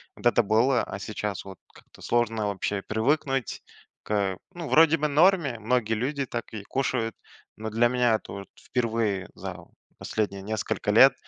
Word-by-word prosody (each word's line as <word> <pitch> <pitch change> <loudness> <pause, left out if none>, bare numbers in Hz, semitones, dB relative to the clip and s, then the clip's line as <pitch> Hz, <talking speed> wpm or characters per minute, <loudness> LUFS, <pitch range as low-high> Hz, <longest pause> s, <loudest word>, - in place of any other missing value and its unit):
вот - - -14
это 120 -1 +4
было, 120 +5 +3
а 100 - -6
сейчас, 100 -2 -4
вот, 95 -2 -9 0.2
как-то - - -18
сложно 115 -3 0
вообще 100 0 -2
привыкнуть 135 +3 0 0.4
к 100 -3 0 0.2
Ну, 170 -3 -6
вроде 165 +1 +6
бы, 150 - -1
в - - -5
норме, 150 - +3
многие 110 0 +1
люди 140 +5 -1
так 120 -2 -6
и 105 -2 -6
кушают, 125 -4 -1 0.4
но 110 0 -4
для 115 +2 +3
меня 125 -2 +3
это, - - -7
вот, 100 0 -7
впервые 110 -6 -1
за - - -6 0.4
последние 100 -3 -2
несколько 110 0 -2
лет, - - +8
115 Hz, 165 wpm, -26 LUFS, 105-130 Hz, 0.4 s, лет